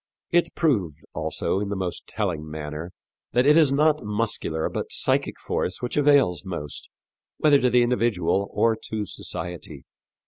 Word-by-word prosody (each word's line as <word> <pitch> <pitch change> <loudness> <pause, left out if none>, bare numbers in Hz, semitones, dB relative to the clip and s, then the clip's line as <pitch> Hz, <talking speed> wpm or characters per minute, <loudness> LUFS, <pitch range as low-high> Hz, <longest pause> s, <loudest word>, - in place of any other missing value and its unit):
It 170 -1 +2
proved, 100 - +1 0.2
also, 95 - -1
in 100 0 -3
the 100 - -2
most 95 -2 -4
telling 85 -8 -3
manner 75 +2 -6 0.4
that 125 +1 +3
it 150 +1 +6
is 155 -4 +5
not 150 +2 +3
muscular 105 -7 -1
but - - -4
psychic - - 0
force 90 - -2
which 125 - -3
avails 140 - +4
most, 85 -6 -6 0.5
whether 145 -2 +4
to 125 - +3
the 120 0 +4
individual 110 -6 +1
or 115 -1 +2
to 110 -1 -2
society. 85 -7 -5
105 Hz, 150 wpm, -25 LUFS, 85-135 Hz, 0.5 s, it